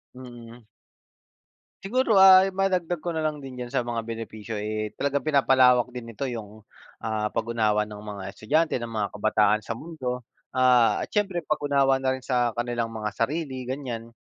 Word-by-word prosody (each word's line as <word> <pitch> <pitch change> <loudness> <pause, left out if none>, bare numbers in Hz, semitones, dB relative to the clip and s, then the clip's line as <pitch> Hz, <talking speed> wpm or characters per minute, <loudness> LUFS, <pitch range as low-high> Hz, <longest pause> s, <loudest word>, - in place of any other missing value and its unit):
Mm. 120 -2 -12 1.2
Siguro, 230 +2 +1
ah, 190 0 +8
madagdag 185 -3 0
ko 175 - -2
na 160 - -2
lang 155 -2 -2
din 130 -2 -8
diyan 125 - -4
sa 120 - -1
mga 115 -1 -4
benepisyo, 115 -1 -6
eh, 105 0 -3
talagang 140 0 0
pinapalawak 130 -4 +4
din 125 -1 -8
nito 115 +4 -6
'yong, 110 -4 -6 0.4
ah, 110 -1 -1
pag-unawa 110 -2 0
ng 105 -1 -9
mga 105 -2 -7
estudyante, 150 +9 0
ng 120 - -5
mga 110 -3 -3
kabataan, 105 0 +2
sa 115 +1 -5
mundo, 125 -4 -5 0.3
ah, 125 -2 +4
at - - -9
siyempre, 195 -5 0
pag-unawa 140 -3 +2
na 130 0 0
rin 130 - -10
sa 125 -3 0
kanilang 120 -1 -2
mga 110 -2 -4
sarili, 130 +2 -3
ganyan. 125 -4 -5
125 Hz, 165 wpm, -25 LUFS, 110-140 Hz, 1.2 s, ah